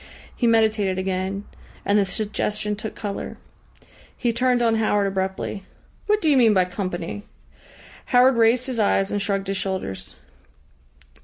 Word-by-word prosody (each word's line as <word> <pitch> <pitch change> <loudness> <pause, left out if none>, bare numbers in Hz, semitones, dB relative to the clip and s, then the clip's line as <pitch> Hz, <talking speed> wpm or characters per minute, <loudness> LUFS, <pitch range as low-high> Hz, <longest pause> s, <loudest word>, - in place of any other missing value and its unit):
He 240 - +1
meditated 215 -4 +2
again, 190 +1 -2 0.4
and 205 +1 +3
the 200 - +3
suggestion 210 +1 -2
took 215 +1 -6
colour. 205 -2 -5 0.8
He 240 -2 0
turned 250 0 +2
on 225 -1 +3
Howard 205 -2 +2
abruptly. 190 0 -2 0.5
"What 425 0 +2
do 315 - +3
you 280 - +4
mean 225 -4 +5
by 185 -1 +4
company?" 180 0 -4 0.8
Howard 255 +1 +5
raised 230 +2 +3
his 255 -4 -3
eyes 200 -2 +2
and 205 - -1
shrugged 195 -1 -1
his 195 0 -2
shoulders. 185 - -4
205 Hz, 145 wpm, -23 LUFS, 195-230 Hz, 0.8 s, mean